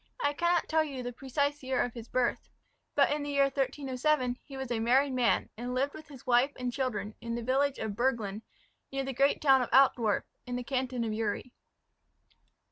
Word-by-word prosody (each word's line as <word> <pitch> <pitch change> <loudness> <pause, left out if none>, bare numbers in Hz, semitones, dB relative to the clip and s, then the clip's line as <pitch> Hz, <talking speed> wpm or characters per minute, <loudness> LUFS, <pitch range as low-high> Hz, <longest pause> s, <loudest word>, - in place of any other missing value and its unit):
I 290 - +1
cannot 345 +2 +1
tell 315 0 +3
you 275 -4 -5
the 245 0 -4
precise 285 +3 -1
year 260 -1 -1
of 245 - -4
his 235 -1 -8
birth; 250 0 -1 0.5
but 285 -1 +4
in 295 0 0
the 290 - -4
year 280 -1 +3
1307 270 -1 0
he 275 - -10
was 265 -2 -5
a 235 - 0
married 260 +4 +3
man, 250 -2 +1
and 245 +2 -4
lived 275 +3 0
with 310 - -11
his 275 -4 -13
wife 245 +2 +4
and 250 -1 -3
children, 230 -6 -2
in 235 0 -3
the 235 - -4
village 270 +3 +1
of 220 -2 -3
Burglen, 225 -4 0 0.5
near 270 0 -2
the 270 0 -3
great 275 +4 +2
town 270 -3 +6
of 245 - -2
Altdorf, 245 -6 +4 0.2
in 245 - -3
the 245 - -3
canton 255 -1 -1
of 220 -1 -2
Uri. 220 +3 -2
260 Hz, 205 wpm, -30 LUFS, 240-280 Hz, 0.5 s, town